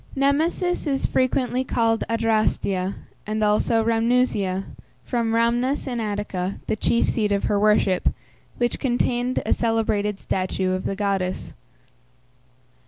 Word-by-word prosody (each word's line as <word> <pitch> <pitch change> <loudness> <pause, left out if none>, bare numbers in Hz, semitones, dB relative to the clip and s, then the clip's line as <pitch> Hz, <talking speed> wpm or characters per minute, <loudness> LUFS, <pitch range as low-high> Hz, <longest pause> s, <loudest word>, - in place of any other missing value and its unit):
Nemesis 315 +6 +1
is 275 -2 0
frequently 255 -1 +1
called 230 -3 +1
Adrastia, 215 -4 0 0.3
and 215 0 -1
also 210 +2 +2
Rhamnusia, 225 -4 +1 0.4
from 235 -3 -1
Rhamnus 240 +4 +1
in 245 -3 -3
Attica, 205 -3 -3
the - - -1
chief 235 +2 +1
seat 210 -3 0
of 200 0 +1
her 205 - +1
worship, 205 -3 +3 0.5
which 240 -1 0
contained 245 0 0
a - - +2
celebrated 215 -3 0
statue 185 0 -1
of 185 0 -2
the 195 - -1
goddess. 195 -2 -2
225 Hz, 120 wpm, -23 LUFS, 200-245 Hz, 0.5 s, worship